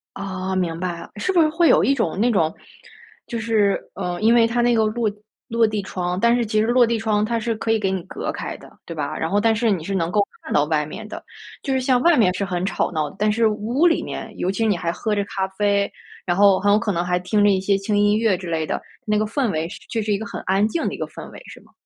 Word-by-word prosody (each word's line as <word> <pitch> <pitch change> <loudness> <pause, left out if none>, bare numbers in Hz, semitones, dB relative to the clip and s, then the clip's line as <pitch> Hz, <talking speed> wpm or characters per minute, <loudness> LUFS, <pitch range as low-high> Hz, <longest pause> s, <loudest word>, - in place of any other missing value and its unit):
哦， 190 -1 -4
明 170 -3 -1
白 175 -2 -3
了。 - - -11
是 210 - -1
不 350 - +4
是 310 - +3
会 325 +2 +3
有 - - +5
一 275 - +3
种 210 -8 -1
那 240 +3 +3
种， 165 -8 +1 0.7
就 235 - -4
是， 215 -3 +2 0.2
呃， 180 -2 -4
因 225 +2 +4
为 230 -1 +5
它 240 +1 0
那 240 0 +3
个 220 -1 +3
落 215 0 0 0.4
落 230 0 +3
地 215 -1 -2
窗， 180 -2 -3
但 235 +2 +4
是 235 -2 0
其 215 0 +1
实 220 - +2
落 245 0 +5
地 230 0 0
窗 215 -1 +1
它 235 +1 -1
是 230 +1 -1
可 225 +1 -1
以 225 - +2
给 195 -2 0
你 190 - -1
隔 - - -5
开 - - -5
的， - - -15 0.2
对 165 - -6
吧？ 145 -3 -3
然 160 - -1
后 205 +3 +1
但 225 +1 +3
是 225 +1 +1
你 180 -5 -2
是 195 - -5
能 170 -2 -1
够 210 - +3 0.2
看 - - -7
到 145 - +3
外 150 -1 0
面 215 +8 -8
的， - - -8 0.4
就 275 - -1
是 260 - +1
像 255 -1 +2
外 340 -2 +5
面 195 -6 +4
是 200 - -2
很 180 -1 -2
吵 190 - -1
闹， 155 -3 -1
但 210 +1 +2
是 225 +1 +3
屋 220 +9 +1
里 335 - +1
面， - - -6
尤 185 - 0
其 225 +3 -1
你 205 -3 +2
还 170 -1 -2
喝 215 +3 -2
着 200 - 0
咖 190 -1 -3
啡， 200 -1 +2 0.3
然 175 -1 0
后 200 -1 +5
很 205 - +2
有 210 - +5
可 215 -2 -1
能 170 -1 -1
还 180 0 +1
听 205 +4 0
着 205 - +5
一 190 -1 +2
些 195 +1 +2
轻 205 +1 -1
音 205 0 +3
乐 220 -4 +2
之 185 -1 -7
类 160 -1 -1
的， - - -3 0.2
那 210 -2 +1
个 215 - +1
氛 235 +2 -1
围 160 -1 -2
是 - - -10
就 230 - -1
是 215 -1 -1
一 200 - +1
个 220 - -5
很 - - -6
安 195 +3 +2
静 330 - -2
的 - - -2
一 - - -8
个 - - -3
氛 - - -10
围， - - -11
是 - - -12
吗？ - - -24
205 Hz, 315 characters per minute, -22 LUFS, 185-225 Hz, 0.7 s, 有